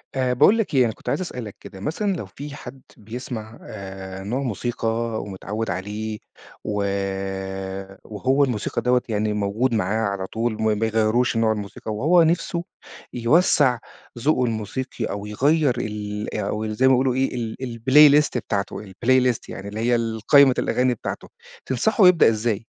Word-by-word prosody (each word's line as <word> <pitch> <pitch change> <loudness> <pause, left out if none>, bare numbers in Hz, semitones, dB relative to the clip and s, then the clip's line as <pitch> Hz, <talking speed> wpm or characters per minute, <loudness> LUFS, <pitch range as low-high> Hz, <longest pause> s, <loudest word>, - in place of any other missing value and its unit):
آآ، 130 -1 +1
باقول 200 - +5
لك 220 -8 -1
إيه؟ 130 - +5
أنا 110 - -1
كنت - - -8
عايز - - 0
أسألك 125 - -6
كده، 95 - -11
مثلًا 190 - -1
لو 135 - -5
في 140 +10 -9
حد 130 -1 -10 0.2
بيسمَع 110 0 -7
آآ، 95 -1 -8
نوع 115 +7 -2
موسيقى 120 -1 -3 0.3
ومتعوِّد 105 +3 -5
عليه، 105 +4 -4 0.4
و - - -3 1.3
وهو 130 +7 +1
الموسيقى 120 -6 -1
دوّة 125 0 +2
يعني 105 0 0
موجود 105 +5 0
معاه 110 +1 0
على 95 -1 -4
طول 115 0 -2
ما 110 - -4
ما 110 -1 +3
بيغيَّروش 110 +2 +1
نوع 115 -1 +3
الموسيقى 105 +1 -5
وهو 165 +10 +4
نِفْسُه 170 +1 0 0.5
يوسَّع 125 0 +3 0.4
ذوقه 130 -1 +2
الموسيقي 115 +2 -3
أو 100 0 -5
يغيَّر 140 +5 +2
ال 105 -2 -4
أو 110 +1 -2
زي 110 +5 +2
ما - - +6
بيقولوا 130 0 +2
إيه 130 -1 0
ال 115 -2 -3 0.2
الplaylist 145 +4 +6
بتاعته 100 -2 -3
الplaylist، 125 +4 +2
يعني 95 - -7
اللي 105 +2 -6
هي 120 +2 +2
ال 115 -1 -2
قايمة 140 -2 +7
الأغاني 125 0 +1
بتاعته، 120 - -6 0.4
تنصحَه 195 - +3
يبدَأ 180 -8 +6
إزاي؟ 110 -1 -1
115 Hz, 160 wpm, -23 LUFS, 105-130 Hz, 1.3 s, قايمة